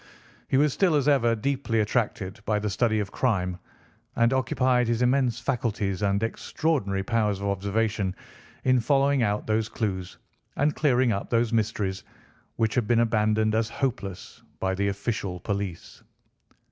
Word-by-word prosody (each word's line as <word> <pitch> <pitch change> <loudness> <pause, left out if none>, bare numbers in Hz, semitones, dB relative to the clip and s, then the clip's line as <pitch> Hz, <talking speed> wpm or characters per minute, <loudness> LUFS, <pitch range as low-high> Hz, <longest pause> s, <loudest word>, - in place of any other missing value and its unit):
He 130 - +2
was 145 0 +3
still, 180 -5 +2
as 145 -1 +1
ever, 120 -5 +3
deeply 120 -1 -1
attracted 105 -2 -1
by 110 -1 0
the 105 0 -2
study 110 +1 +1
of 100 -1 -3
crime, 90 -7 0 0.6
and 115 +2 +3
occupied 130 -1 +2
his 120 +1 +1
immense 125 -1 +2
faculties 110 -7 -1
and 100 +1 +1
extraordinary 115 -5 -1
powers 105 -2 0
of 100 - -4
observation 100 0 -1 0.5
in 130 -1 +4
following 140 +2 +2
out 105 -2 0
those 110 0 0
clues, 95 -6 -3 0.4
and 145 +1 +2
clearing 130 -4 +3
up 100 -1 -3
those 115 0 +1
mysteries 105 -3 -1 0.5
which 110 -1 0
had 120 -5 0
been 120 -1 +3
abandoned 110 -1 +2
as 110 0 +1
hopeless 110 -9 -4 0.2
by 95 0 0
the 100 +1 0
official 100 -2 -3
police. 100 -4 -5
110 Hz, 150 wpm, -26 LUFS, 100-125 Hz, 0.6 s, in